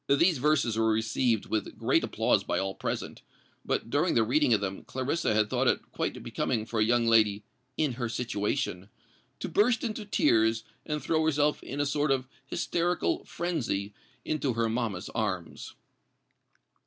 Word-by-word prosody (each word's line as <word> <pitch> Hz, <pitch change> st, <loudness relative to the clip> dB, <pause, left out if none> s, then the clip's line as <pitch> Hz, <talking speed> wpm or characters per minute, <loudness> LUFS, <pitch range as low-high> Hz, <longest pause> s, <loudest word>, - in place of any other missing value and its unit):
These 155 Hz, +2 st, +4 dB
verses 140 Hz, -6 st, +2 dB
were 110 Hz, 0 st, +3 dB
received 110 Hz, +1 st, +1 dB
with 110 Hz, -, -3 dB
great -, -, +2 dB
applause -, -, +1 dB
by -, -, -1 dB
all 95 Hz, 0 st, -1 dB
present; -, -, -4 dB, 0.4 s
but 115 Hz, -, -2 dB
during 160 Hz, +5 st, +2 dB
the 115 Hz, -, +5 dB
reading 130 Hz, +4 st, +2 dB
of 110 Hz, -, +5 dB
them 95 Hz, -1 st, -4 dB
Clarissa 130 Hz, -1 st, -1 dB
had 105 Hz, -1 st, +3 dB
thought -, -, 0 dB
it -, -, 0 dB
quite -, -, -3 dB
becoming 110 Hz, -4 st, -1 dB
for 115 Hz, -1 st, -3 dB
a -, -, +5 dB
young 120 Hz, +1 st, +2 dB
lady 110 Hz, -3 st, +4 dB, 0.3 s
"in 150 Hz, -5 st, +1 dB
her 120 Hz, -1 st, -3 dB
situation" 105 Hz, -3 st, -2 dB, 0.5 s
to -, -, -3 dB
burst 225 Hz, +3 st, +2 dB
into 220 Hz, -2 st, -3 dB
tears, 110 Hz, -, +2 dB, 0.2 s
and 150 Hz, -1 st, -2 dB
throw 160 Hz, -1 st, +1 dB
herself 150 Hz, -1 st, +2 dB
in 140 Hz, -, -6 dB
a 145 Hz, -, +2 dB
sort 145 Hz, +1 st, 0 dB
of 130 Hz, -1 st, +1 dB, 0.2 s
hysterical 175 Hz, +5 st, 0 dB
frenzy 120 Hz, -, -2 dB, 0.3 s
into 145 Hz, -4 st, 0 dB
her 115 Hz, 0 st, +1 dB
mamma's 110 Hz, -5 st, -2 dB
arms. 95 Hz, -9 st, -4 dB
120 Hz, 165 wpm, -29 LUFS, 110-150 Hz, 0.5 s, the